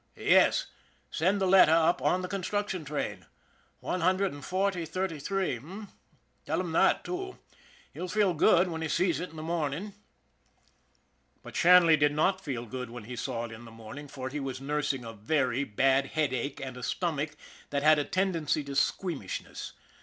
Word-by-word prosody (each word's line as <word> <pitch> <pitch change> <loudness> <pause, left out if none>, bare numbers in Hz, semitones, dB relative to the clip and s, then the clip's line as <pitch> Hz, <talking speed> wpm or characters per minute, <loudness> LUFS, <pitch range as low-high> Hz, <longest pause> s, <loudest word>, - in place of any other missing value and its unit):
Yes, - - +4 0.5
send 190 +5 +1
the 190 - +1
letter 185 -4 +6
up 165 +1 +3
on 185 +1 +1
the - - -2
construction 195 -1 -2
train. 150 0 -4 0.5
One 180 - -2
hundred 185 +1 +2
and 145 -1 -10
forty, 190 -1 0
thirty 165 0 -3
three, 190 -2 -1
h'm? 190 - -10 0.5
Tell - - -1
him - - -3
that, - - +3
too. 380 +1 -5 0.6
He'll 180 - -5
feel 200 0 +2
good 170 +3 +4
when 165 -2 -4
he 160 - -1
sees 175 +1 +1
it 180 - -5
in - - -15
the 155 - -6
morning." 165 +4 -2 1.5
But - - -11
Shanley 175 -2 +6
did 145 0 +3
not 185 +5 +1
feel 125 -7 -4
good 125 +2 -6
when 120 -1 -8
he 125 +4 -7
saw 120 -2 -3
it 115 - -9
in 110 +1 -10
the - - -11
morning, 115 +6 -10
for 130 -2 -6
he 150 +3 -4
was 135 -2 -4
nursing 140 -2 -2
a 115 - -7
very 125 +3 0
bad 135 +4 +2
headache 140 -3 -2
and 130 -2 -6
a - - -8
stomach 150 -1 -2 0.3
that 140 0 -1
had 155 0 +6
a - - +1
tendency 165 -3 0
to 140 0 -7
squeamishness. 145 - -2
155 Hz, 180 wpm, -29 LUFS, 135-185 Hz, 1.5 s, letter